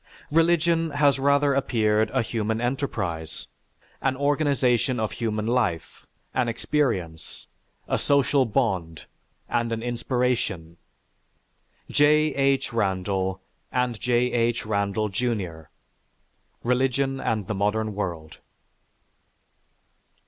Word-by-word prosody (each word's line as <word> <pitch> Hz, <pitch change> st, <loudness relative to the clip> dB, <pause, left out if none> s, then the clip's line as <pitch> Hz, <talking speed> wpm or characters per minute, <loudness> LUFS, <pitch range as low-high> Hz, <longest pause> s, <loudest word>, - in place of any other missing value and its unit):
Religion 165 Hz, 0 st, +3 dB
has 145 Hz, -2 st, +2 dB
rather 140 Hz, +1 st, +3 dB
appeared 110 Hz, -5 st, +1 dB
a 130 Hz, +1 st, 0 dB
human 110 Hz, -1 st, -2 dB
enterprise, 105 Hz, -, -3 dB, 0.6 s
an 135 Hz, -1 st, +1 dB
organization 140 Hz, -3 st, +1 dB
of 110 Hz, -1 st, -1 dB
human 110 Hz, -2 st, -2 dB
life, 115 Hz, -9 st, -1 dB, 0.3 s
an 125 Hz, -2 st, +1 dB
experience, 115 Hz, -, -2 dB, 0.4 s
a -, -, 0 dB
social 140 Hz, -1 st, +3 dB
bond, 100 Hz, -9 st, -1 dB, 0.4 s
and 115 Hz, 0 st, -1 dB
an 115 Hz, 0 st, -2 dB
inspiration." 120 Hz, -8 st, -1 dB, 1.1 s
(_J. 150 Hz, +1 st, +4 dB
H. 135 Hz, -2 st, +1 dB
Randall 95 Hz, -2 st, -1 dB, 0.3 s
and 125 Hz, -3 st, 0 dB
J. 125 Hz, 0 st, +1 dB
H. 115 Hz, -1 st, 0 dB
Randall, 105 Hz, 0 st, 0 dB
Jr.: 95 Hz, -7 st, -2 dB, 1.0 s
"Religion 135 Hz, +2 st, +1 dB
and 110 Hz, -5 st, -1 dB
the 105 Hz, -, -3 dB
Modern 105 Hz, +2 st, 0 dB
World." 85 Hz, -6 st, -5 dB
120 Hz, 100 wpm, -25 LUFS, 105-135 Hz, 1.1 s, J